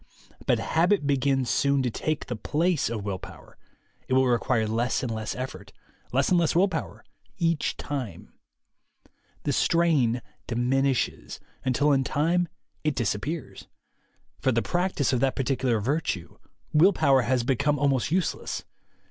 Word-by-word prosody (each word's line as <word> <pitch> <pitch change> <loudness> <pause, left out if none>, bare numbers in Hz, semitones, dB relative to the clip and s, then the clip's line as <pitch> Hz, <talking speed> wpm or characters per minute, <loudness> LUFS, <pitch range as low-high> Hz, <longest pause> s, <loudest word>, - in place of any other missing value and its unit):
But - - +4
habit 170 0 +2
begins 135 -2 +1
soon 140 +1 +2
to 125 - 0
take 155 +6 -2
the 120 - -4
place 160 +7 0
of 110 -3 -4
will 100 -2 -3
power; - - -12 0.5
it - - -1
will 130 0 +4
require 120 -2 +1
less 115 +4 0
and 120 -3 -2
less 110 -2 -4
effort, 130 +1 -6 0.4
less 135 +2 +2
and 180 - +4
less 165 -2 +1
will 185 +4 +5
power, 165 -4 -5 0.3
each 165 -4 0
time; 125 - -5 1.1
the - - 0
strain 145 -9 +2 0.2
diminishes, 130 +2 0 0.2
until 140 +3 +2
in 135 -1 +3
time 170 +6 +1 0.4
it 150 -2 0
disappears. 130 +6 -3 0.7
For 130 - +2
the 115 -1 +1
practice 175 -7 0
of 125 - +2
that 135 +1 +1
particular 130 -3 0
virtue, 115 - -2 0.3
will 175 +6 +6
power 140 -5 +4
has 125 +1 +1
become 140 +4 +1
almost 135 -3 +1
useless. 180 +1 -1
135 Hz, 145 wpm, -26 LUFS, 120-155 Hz, 1.1 s, will